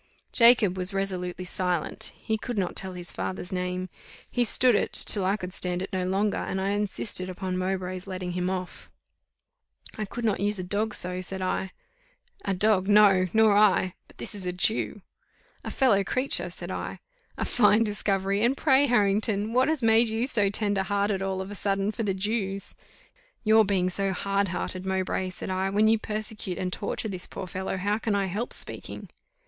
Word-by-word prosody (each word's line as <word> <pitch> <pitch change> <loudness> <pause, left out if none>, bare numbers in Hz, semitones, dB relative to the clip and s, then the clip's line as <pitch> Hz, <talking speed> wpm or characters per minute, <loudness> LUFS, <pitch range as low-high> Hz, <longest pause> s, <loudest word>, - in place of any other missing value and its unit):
Jacob 230 -6 +5
was 185 +2 0
resolutely 185 -2 -3
silent; 180 -2 0
he 220 -1 -3
would 240 -3 -3
not 190 -3 -1
tell 190 -1 -5
his 175 -1 -3
father's 185 0 -4
name. 180 0 -2 0.4
He 245 - +2
stood 245 +2 +4
it, 205 - 0
till 200 - +4
I 195 +3 +1
could 180 -2 -7
stand 180 0 -1
it 195 - -8
no 185 -1 -1
longer, 200 +2 0
and 190 - -3
I 190 +1 -1
insisted 205 -2 -1
upon 185 0 -4
Mowbray's 185 0 -3
letting 185 -1 -4
him 180 +1 -1
off. 185 -1 -5 1.1
"I 215 - -1
could 235 +3 -5
not 210 -3 +1
use 205 +1 +1
a 185 - -3
dog 210 +4 -1
so," 180 0 -1
said 190 +1 -4
I. 185 +1 -1 0.7
"A 195 - -1
dog, 195 -1 +2
no! 205 -3 +5
nor 220 -1 +4
I; 200 -3 +4
but - - -21
this - - -2
is 195 -3 -5
a - - 0
Jew." 205 +2 -1 0.6
"A - - -5
fellow 220 -8 +3
creature," 255 +7 0
said - - -7
I. - - -5 0.4
"A - - -1
fine 210 -1 +4
discovery! 200 -1 0
And 255 +4 +2
pray, 280 -1 +4
Harrington, 210 -1 +1
what 255 +2 +3
has 310 -5 +1
made 225 +1 +5
you 225 +2 0
so 210 -7 +3
tender 205 -1 0
hearted 200 0 0
all 190 -1 -2
of 190 +1 -7
a - - -5
sudden 195 0 0
for 225 - -5
the 200 -4 -1
Jews?" 195 -1 -2 0.7
"Your 220 0 +6
being 195 -3 +1
so 195 +1 0
hard 200 +2 0
hearted, 185 +1 -3
Mowbray," 190 0 -1
said 185 - -6
I: 190 +1 0
"when 210 +2 +3
you 225 0 +4
persecute 215 -4 -4
and 180 -1 -3
torture 205 +2 -3
this 185 -4 -6
poor 195 - -6
fellow, 190 +1 -4
how 205 +3 0
can 220 -2 -1
I 200 -1 +1
help 205 +6 -3
speaking?" - - -3
195 Hz, 190 wpm, -26 LUFS, 185-215 Hz, 1.1 s, Your